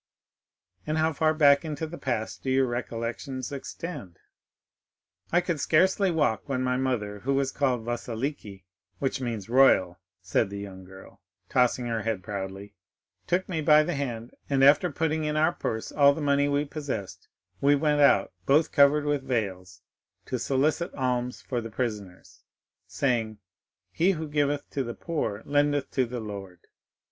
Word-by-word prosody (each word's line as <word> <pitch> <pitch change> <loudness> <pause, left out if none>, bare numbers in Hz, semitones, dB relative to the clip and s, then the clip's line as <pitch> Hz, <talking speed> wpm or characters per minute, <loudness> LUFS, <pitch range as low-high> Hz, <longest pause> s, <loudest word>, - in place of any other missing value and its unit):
"And 155 - 0
how 160 0 +2
far 155 +2 +2
back 145 -3 +5
into 155 -1 -4
the 165 +2 -8
past 120 -4 -3
do 130 - -3
your 130 0 +3
recollections 120 +2 -4
extend?" 140 - -7 1.1
"I 175 - +4
could 170 -4 -2
scarcely 190 +7 +3
walk 145 -7 0
when 130 -1 -1
my 125 0 +1
mother, 120 -6 -2
who 135 +6 -1
was 135 -1 0
called 125 -5 0
Vasiliki, 120 - -4 0.3
which 135 -1 -2
means 115 -5 -4
royal," 115 -8 +4 0.2
said 95 +3 0
the 100 - -6
young 95 -2 -8
girl, 95 +1 -14 0.3
tossing 125 -1 +2
her 115 -2 -2
head 110 -3 -2
proudly, 100 0 -6 0.5
"took 180 +2 0
me 165 -4 -2
by 150 0 +6
the 175 +3 -2
hand, 120 -5 -4 0.2
and 135 -1 +2
after 145 +5 +5
putting 160 +1 -1
in 150 0 -1
our 155 - +3
purse 110 0 -4
all 140 -1 +5
the - - -5
money 140 -1 +2
we 145 +1 +1
possessed, 110 - -6 0.3
we 145 +1 +5
went 150 0 +2
out, 120 -8 +4 0.2
both 150 +3 +4
covered 145 +1 +4
with 145 -1 0
veils, 95 -8 -3 0.4
to - - -3
solicit 150 +6 0
alms 125 -2 -2
for 120 -2 -2
the 115 - -7
prisoners, 105 -6 -5 0.5
saying, 115 -5 -1 0.5
'He 180 - +2
who 160 -2 -5
giveth 145 -1 0
to 135 - -1
the 120 -1 -6
poor 110 -11 -3
lendeth 145 0 +1
to 130 -2 +1
the 125 +1 -5
Lord. 100 -4 -8
130 Hz, 160 wpm, -27 LUFS, 110-145 Hz, 1.1 s, by